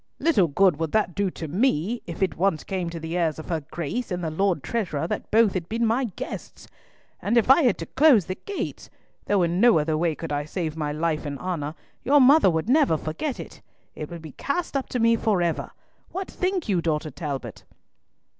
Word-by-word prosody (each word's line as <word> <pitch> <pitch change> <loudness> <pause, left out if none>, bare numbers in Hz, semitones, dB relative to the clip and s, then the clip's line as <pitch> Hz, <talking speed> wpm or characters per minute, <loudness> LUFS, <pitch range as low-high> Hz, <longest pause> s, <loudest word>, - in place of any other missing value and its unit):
"Little 280 - +3
good 175 +2 +3
would 165 -2 -2
that 210 -5 +1
do 200 +1 0
to 165 -2 -7
me, 205 - 0
if 170 +1 -7
once 185 -4 +1
it - - -30
came 185 -3 -2
to 170 0 -6
the 160 +1 -5
ears 165 -3 0
of 155 - -9
her 165 -2 -1
Grace 170 - -4
and 180 -2 -3
the 160 - -2
Lord 180 -2 0
Treasurer 175 -10 -2
that - - -4
both 220 -2 +4
had 175 -3 -4
been 230 +1 0
my 235 +4 +1
guests! - - -7 0.5
And 230 +4 +1
if 235 +2 +5
I 275 - +7
had 245 -8 +3
to 165 - -5
close 265 - +4
the 185 - -3
gates—though 205 - -4
in 170 +2 0
no 235 -4 +6
other 155 +1 +1
way 160 0 0
could 165 0 -6
I 145 0 -1
save 160 -1 -3
my 150 -2 -2
life 155 +1 -1
and 145 -2 -4
honour—your 180 - -1
mother 275 -3 +6
would 160 +2 -1
never 270 - +4
forget 200 - -4
it. - - -9 0.3
It 150 - -7
would 170 -2 -8
be 155 - -8
cast 285 - -3
up 275 - -1
to 250 - -2
me 230 0 +4
for 215 -4 +1
ever. 170 -2 -1 0.4
What 380 +2 -5
think 370 -1 -1
you, 185 -5 +1
daughter 155 -2 -1
Talbot?" 140 -2 -6
180 Hz, 210 wpm, -25 LUFS, 160-230 Hz, 0.5 s, I